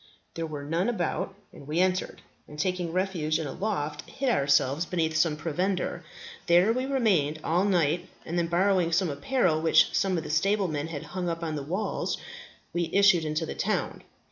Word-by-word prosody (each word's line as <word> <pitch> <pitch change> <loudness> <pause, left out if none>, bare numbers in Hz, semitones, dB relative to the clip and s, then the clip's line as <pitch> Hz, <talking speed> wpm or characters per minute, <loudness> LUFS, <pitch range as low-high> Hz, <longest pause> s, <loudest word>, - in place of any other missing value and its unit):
There 165 0 -3
were 150 -2 -6
none 165 +8 0
about, 195 -2 -2 0.2
and 140 - -13
we 155 +3 -1
entered, 185 0 0 0.2
and, 150 - -11
taking 180 +1 -1
refuge 175 -4 0
in 160 - -3
a 140 - -4
loft, 150 -8 -3
hid 270 -1 -1
ourselves 140 - +2
beneath 165 -3 -1
some 155 -1 +2
provender. 180 +5 -2 0.4
There 180 +6 +5
we 255 +2 -2
remained 195 - +2
all 175 +4 +2
night, 175 -3 +1 0.2
and 170 - -4
then 170 -1 +1
borrowing 180 0 +2
some 175 -1 +2
apparel 155 - +1
which 160 - +4
some 190 -2 +1
of 160 - -2
the - - -5
stablemen 160 -2 +1
had 155 -4 -6
hung 180 -1 -4
up 165 0 -4
on 160 -2 -2
the 145 - -3
walls, 185 +9 -2 0.6
we 170 -1 -1
issued 195 -4 +5
into 155 +2 -1
the - - -5
town. - - -2
170 Hz, 185 wpm, -27 LUFS, 155-190 Hz, 0.6 s, There